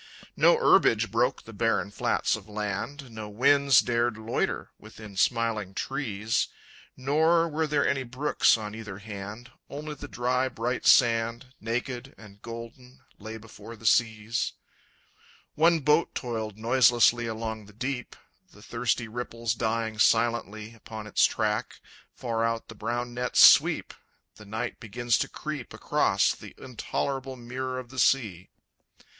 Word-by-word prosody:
No -, -, +5 dB
herbage -, -, +4 dB
broke -, -, +1 dB
the 115 Hz, -, -12 dB
barren 115 Hz, -1 st, 0 dB
flats -, -, 0 dB
of 110 Hz, -1 st, -11 dB
land, 105 Hz, +6 st, -4 dB
No 110 Hz, -1 st, -7 dB
winds 140 Hz, +4 st, +4 dB
dared 120 Hz, -1 st, 0 dB
loiter 110 Hz, +1 st, -2 dB
within 110 Hz, -1 st, -12 dB
smiling 110 Hz, -3 st, 0 dB
trees, 115 Hz, -6 st, -1 dB, 0.5 s
Nor 160 Hz, +5 st, +3 dB
were 160 Hz, 0 st, -1 dB
there 150 Hz, -1 st, +1 dB
any 140 Hz, -1 st, +1 dB
brooks 130 Hz, +1 st, +2 dB
on 105 Hz, -1 st, -6 dB
either 110 Hz, -3 st, -7 dB
hand, 105 Hz, +2 st, -8 dB, 0.2 s
Only 150 Hz, +2 st, -6 dB
the 145 Hz, -, -9 dB
dry, 125 Hz, +1 st, 0 dB
bright 120 Hz, +1 st, -2 dB
sand, 115 Hz, +1 st, +3 dB
Naked 125 Hz, +3 st, -4 dB
and 105 Hz, -2 st, -15 dB
golden, 115 Hz, +3 st, -10 dB, 0.2 s
lay 110 Hz, +2 st, -7 dB
before 115 Hz, +1 st, -12 dB
the 115 Hz, -, -15 dB
seas. 110 Hz, 0 st, +1 dB, 1.0 s
One 165 Hz, +1 st, +3 dB
boat 150 Hz, +3 st, +2 dB
toiled 110 Hz, -4 st, -4 dB
noiselessly 120 Hz, 0 st, +4 dB
along 110 Hz, -1 st, -5 dB
the -, -, -14 dB
deep, 125 Hz, +3 st, -4 dB, 0.4 s
The 105 Hz, -, -16 dB
thirsty 120 Hz, 0 st, -1 dB
ripples 115 Hz, 0 st, -3 dB
dying 110 Hz, -1 st, -2 dB
silently 115 Hz, -2 st, +1 dB
Upon 110 Hz, -1 st, -9 dB
its 105 Hz, -, +3 dB
track. 105 Hz, -1 st, -1 dB, 0.4 s
Far 115 Hz, -2 st, -2 dB
out 115 Hz, 0 st, -2 dB
the -, -, -8 dB
brown 120 Hz, +3 st, -3 dB
nets 125 Hz, +1 st, -1 dB
sweep, -, -, +6 dB, 0.5 s
And 105 Hz, -1 st, -13 dB
night 115 Hz, +3 st, -4 dB
begins 120 Hz, +1 st, 0 dB
to -, -, -1 dB
creep -, -, -6 dB
Across -, -, +2 dB
the -, -, -12 dB
intolerable 130 Hz, +1 st, -4 dB
mirror 130 Hz, +1 st, -5 dB
of 125 Hz, -2 st, -7 dB
the 130 Hz, 0 st, -6 dB
sea. 105 Hz, -11 st, +1 dB
115 Hz, 140 wpm, -27 LUFS, 110-130 Hz, 1.0 s, sweep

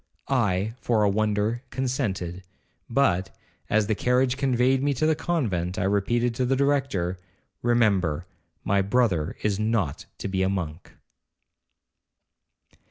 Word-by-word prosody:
I, 105 Hz, -5 st, +1 dB
for 110 Hz, -3 st, +2 dB
a 105 Hz, -, +4 dB
wonder, 105 Hz, +2 st, 0 dB
consented; 105 Hz, -9 st, -2 dB, 0.5 s
but, 100 Hz, -8 st, +2 dB, 0.4 s
as 110 Hz, 0 st, +3 dB
the 110 Hz, -, +1 dB
carriage 125 Hz, +3 st, +2 dB
conveyed 130 Hz, -1 st, +2 dB
me 140 Hz, 0 st, +1 dB
to 140 Hz, -, 0 dB
the 160 Hz, -, +4 dB
convent, 105 Hz, -, -1 dB
I 105 Hz, -, 0 dB
repeated 115 Hz, +5 st, +1 dB
to 125 Hz, +2 st, 0 dB
the 135 Hz, -, +2 dB
Director, 130 Hz, -11 st, 0 dB, 0.4 s
'Remember, 100 Hz, -9 st, +2 dB, 0.4 s
my 100 Hz, 0 st, +2 dB
brother 95 Hz, -7 st, +1 dB
is 105 Hz, -2 st, 0 dB
not 110 Hz, -9 st, -1 dB
to -, -, -4 dB
be 95 Hz, -1 st, -1 dB
a 95 Hz, -, +2 dB
monk.' 85 Hz, -3 st, -4 dB
110 Hz, 130 wpm, -25 LUFS, 95-125 Hz, 0.5 s, a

